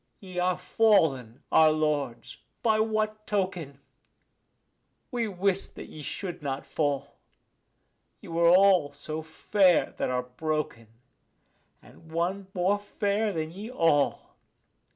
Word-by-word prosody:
Ye 185 Hz, -2 st, -6 dB
are 180 Hz, 0 st, +1 dB
fallen, 160 Hz, -, +2 dB
our 160 Hz, -1 st, +6 dB
lords, 150 Hz, -6 st, -2 dB, 0.3 s
by 220 Hz, -2 st, +3 dB
what 215 Hz, -1 st, -1 dB
token? 180 Hz, -9 st, -2 dB, 1.3 s
we 240 Hz, -3 st, -1 dB
wist 195 Hz, 0 st, -1 dB
that -, -, -9 dB
ye 155 Hz, -, -10 dB
should 175 Hz, +5 st, -5 dB
not 140 Hz, -1 st, -4 dB
fall. 145 Hz, -3 st, -2 dB, 1.0 s
Ye -, -, -13 dB
were 170 Hz, 0 st, +3 dB
all 185 Hz, -5 st, +5 dB
so 155 Hz, +2 st, -5 dB
fair 180 Hz, +3 st, +2 dB
that -, -, -1 dB
are 125 Hz, 0 st, -1 dB
broken; 125 Hz, -2 st, -3 dB, 1.0 s
and 160 Hz, -1 st, -17 dB
one 180 Hz, +4 st, -2 dB
more 190 Hz, +3 st, +2 dB
fair 205 Hz, +1 st, -1 dB
than 160 Hz, -3 st, -3 dB
ye 200 Hz, +6 st, -8 dB
all. 165 Hz, -, +1 dB
175 Hz, 120 wpm, -27 LUFS, 150-200 Hz, 1.3 s, our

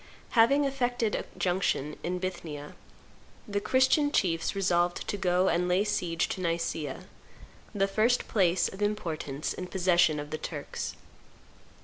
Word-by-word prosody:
Having 275 Hz, +5 st, +5 dB
effected 245 Hz, -5 st, 0 dB
a -, -, -2 dB
junction 175 Hz, -5 st, 0 dB
in 180 Hz, +1 st, -2 dB
Bithynia, 160 Hz, -5 st, -5 dB, 0.7 s
the 205 Hz, -1 st, -1 dB
Christian 260 Hz, +5 st, +3 dB
chiefs 165 Hz, -, +1 dB
resolved 175 Hz, -2 st, +1 dB
to -, -, -1 dB
go 185 Hz, -2 st, +2 dB
and 175 Hz, +1 st, +2 dB
lay 180 Hz, +3 st, +3 dB
siege 170 Hz, -5 st, 0 dB
to 185 Hz, -, -4 dB
Nicaea, 165 Hz, -4 st, -2 dB, 0.7 s
the 195 Hz, -1 st, +2 dB
first 225 Hz, +5 st, +2 dB
place, 180 Hz, -4 st, +2 dB
of 190 Hz, -, -9 dB
importance, 165 Hz, -9 st, -2 dB
in 180 Hz, -, -6 dB
possession 180 Hz, -4 st, +3 dB
of 145 Hz, 0 st, -7 dB
the 155 Hz, -, -3 dB
Turks. 145 Hz, -3 st, -5 dB
180 Hz, 135 wpm, -29 LUFS, 165-210 Hz, 0.7 s, Having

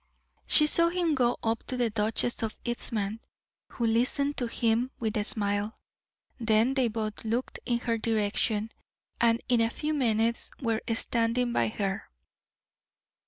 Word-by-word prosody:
She 300 Hz, -, +6 dB
saw 335 Hz, +2 st, +5 dB
him 345 Hz, -2 st, 0 dB
go 245 Hz, -3 st, +1 dB
up 225 Hz, 0 st, 0 dB
to 255 Hz, -, -4 dB
the 240 Hz, -2 st, +1 dB
Duchess 220 Hz, +3 st, 0 dB
of 225 Hz, -1 st, -3 dB
Eastham, 225 Hz, -3 st, -1 dB, 0.5 s
who 235 Hz, -, -1 dB
listened 255 Hz, +5 st, +1 dB
to 245 Hz, -, -1 dB
him 230 Hz, +2 st, +1 dB
with 220 Hz, -1 st, -2 dB
a 210 Hz, -, +1 dB
smile, 205 Hz, +1 st, 0 dB, 0.6 s
then 225 Hz, +2 st, +3 dB
they 260 Hz, -3 st, +2 dB
both 215 Hz, -1 st, -4 dB
looked 230 Hz, +3 st, -2 dB
in 240 Hz, -, +2 dB
her 230 Hz, -2 st, -1 dB
direction, 220 Hz, 0 st, 0 dB, 0.5 s
and 230 Hz, 0 st, +2 dB
in 245 Hz, -2 st, +3 dB
a 225 Hz, -, +2 dB
few 300 Hz, +6 st, -3 dB
minutes 230 Hz, -4 st, +1 dB
were 230 Hz, -4 st, -1 dB
standing 235 Hz, +1 st, 0 dB
by 115 Hz, -, +2 dB
her. 195 Hz, -, -3 dB
230 Hz, 150 wpm, -28 LUFS, 220-245 Hz, 0.6 s, She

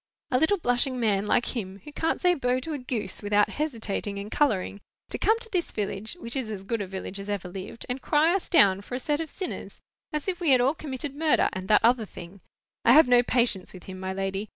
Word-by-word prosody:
"A 255 Hz, -, +3 dB
little 320 Hz, +7 st, +3 dB
blushing 255 Hz, -4 st, 0 dB
man 210 Hz, -3 st, +1 dB
like 245 Hz, -, +1 dB
him, 195 Hz, -4 st, -5 dB
who 295 Hz, -, -10 dB
can't 320 Hz, +2 st, -1 dB
say 360 Hz, -1 st, +4 dB
bo 250 Hz, -5 st, 0 dB
to 315 Hz, +4 st, -4 dB
a 290 Hz, -, -3 dB
goose 220 Hz, -7 st, -3 dB
without 205 Hz, 0 st, +3 dB
hesitating 220 Hz, -8 st, -3 dB
and 200 Hz, +2 st, -6 dB
colouring, 205 Hz, -8 st, 0 dB, 0.3 s
to -, -, -2 dB
come 440 Hz, +1 st, +3 dB
to 460 Hz, 0 st, -10 dB
this 355 Hz, -3 st, -1 dB
village—which 220 Hz, -, -3 dB
is 260 Hz, -5 st, -2 dB
as 200 Hz, -3 st, -5 dB
good 225 Hz, +2 st, -2 dB
a 195 Hz, -, -4 dB
village 190 Hz, +1 st, -5 dB
as 195 Hz, +1 st, -7 dB
ever 200 Hz, -3 st, -2 dB
lived—and 205 Hz, +7 st, -6 dB
cry 310 Hz, +5 st, +3 dB
us 385 Hz, -, -1 dB
down 195 Hz, -, +5 dB
for 245 Hz, -, -6 dB
a -, -, -2 dB
set 295 Hz, +4 st, -1 dB
of 320 Hz, -, -5 dB
sinners, 370 Hz, +4 st, -6 dB, 0.3 s
as 300 Hz, +2 st, -3 dB
if 365 Hz, -2 st, -1 dB
we 340 Hz, -4 st, +1 dB
had 260 Hz, -2 st, +6 dB
all 260 Hz, +4 st, +3 dB
committed 280 Hz, -2 st, -4 dB
murder 310 Hz, +1 st, +3 dB
and 185 Hz, 0 st, -5 dB
that 215 Hz, +1 st, +5 dB
other 235 Hz, -2 st, +3 dB
thing!—I 190 Hz, +6 st, -3 dB
have 310 Hz, +1 st, +7 dB
no 245 Hz, -1 st, +6 dB
patience 235 Hz, -6 st, 0 dB
with 180 Hz, -, -11 dB
him, 185 Hz, -1 st, -8 dB
my 190 Hz, 0 st, -3 dB
lady. 195 Hz, +2 st, -3 dB
240 Hz, 230 wpm, -27 LUFS, 200-295 Hz, 0.3 s, have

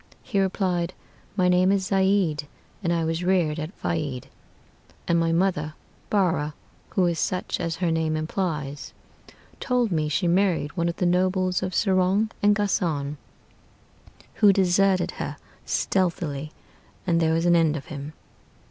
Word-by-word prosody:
He 215 Hz, -6 st, -1 dB
replied, 185 Hz, -2 st, 0 dB, 0.4 s
'My 185 Hz, -3 st, +3 dB
name 180 Hz, +1 st, +4 dB
is 195 Hz, -1 st, +1 dB
Zeid, 190 Hz, -6 st, +1 dB, 0.3 s
and 170 Hz, -3 st, 0 dB
I 165 Hz, -1 st, +1 dB
was 165 Hz, +2 st, -1 dB
reared 175 Hz, -4 st, +1 dB
at 155 Hz, +2 st, -4 dB
Faid; 145 Hz, -7 st, -3 dB, 0.8 s
And 170 Hz, 0 st, +3 dB
my 165 Hz, 0 st, +1 dB
mother 165 Hz, -3 st, 0 dB, 0.3 s
Barrah 165 Hz, -7 st, +1 dB, 0.3 s
(who 185 Hz, -, +2 dB
is 170 Hz, -2 st, 0 dB
such 185 Hz, +4 st, -1 dB
as 165 Hz, -1 st, -2 dB
her 175 Hz, -2 st, 0 dB
name 160 Hz, -1 st, 0 dB
implies), 155 Hz, -4 st, -3 dB, 0.7 s
Told 245 Hz, -4 st, +1 dB
me 155 Hz, -3 st, 0 dB
she 180 Hz, +4 st, 0 dB
married 175 Hz, -4 st, +1 dB
one 170 Hz, -1 st, 0 dB
of 170 Hz, -, -3 dB
the 180 Hz, -, -1 dB
nobles 185 Hz, +1 st, +1 dB
of 185 Hz, -1 st, -3 dB
Serong 195 Hz, +2 st, +2 dB
and 205 Hz, 0 st, +4 dB
Ghassân, 160 Hz, -8 st, -1 dB, 1.2 s
Who 205 Hz, -, +7 dB
deserted 190 Hz, 0 st, +2 dB
her -, -, -4 dB, 0.3 s
stealthily, 160 Hz, -6 st, -1 dB, 0.5 s
and 170 Hz, -3 st, +2 dB
there 160 Hz, -1 st, +2 dB
was 165 Hz, +1 st, 0 dB
an 175 Hz, 0 st, +5 dB
end 160 Hz, -2 st, +3 dB
of 140 Hz, -, -8 dB
him.' 145 Hz, +1 st, -7 dB
175 Hz, 150 wpm, -25 LUFS, 160-190 Hz, 1.2 s, Who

